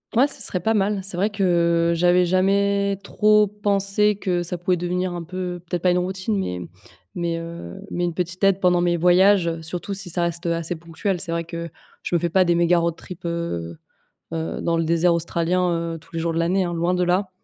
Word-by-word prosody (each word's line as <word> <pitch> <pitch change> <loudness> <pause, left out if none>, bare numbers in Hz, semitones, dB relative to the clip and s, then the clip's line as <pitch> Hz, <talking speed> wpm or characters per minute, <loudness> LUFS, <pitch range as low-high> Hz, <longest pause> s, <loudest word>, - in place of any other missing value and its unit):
Ouais, 255 +5 +5
ce 285 - -5
serait 180 - -1
pas 220 +6 +1
mal. 205 -1 +1
C'est 185 -2 -5
vrai 200 +4 +2
que 170 -4 +2
j'avais 175 +1 +3
jamais 200 +2 +2
trop 210 +1 +4
pensé 205 0 +1
que 185 -3 -1
ça 175 +1 -4
pouvait 180 +1 0
devenir, 180 +1 -2
un 175 -1 -5
peu 180 +1 -5
peut-être 175 -1 -2
pas 180 - +4
une 180 - +2
routine, 190 +3 -1
mais 90 - -3 0.5
mais, 170 -1 -1
heu, 165 - -8
mais 175 0 -1
une 175 - -2
petite 180 +1 -4
aide 195 -1 +4
pendant 180 -1 +4
mes 175 0 +2
voyages, 180 0 +4
surtout 175 +4 -5
si 195 -2 -3
ça 175 +1 -1
reste, 170 0 -2
heu, 170 - +1
assez 165 +1 -3
ponctuel. 170 +3 -3
C'est 170 -1 -5
vrai 170 0 -1
que 170 0 -6 0.3
je - - -1
me - - +3
fais 170 - -1
pas 185 +2 +3
des 170 -1 +2
méga 170 0 +3
road 170 -1 0
trip, 180 0 -11
heu 85 - -3 0.6
heu, 160 0 -3
dans 170 0 0
le 165 - +1
désert 170 +1 +3
australien, 170 +2 +1 0.2
heu, - - -7
tous 165 - -22
les - - -2
jours 165 0 -1
de 165 - -2
l'année, 185 +3 +1
hein, 175 -1 -3
loin 170 +2 0
de 180 0 +1
là. 185 +2 +1
175 Hz, 225 wpm, -22 LUFS, 170-190 Hz, 0.6 s, Ouais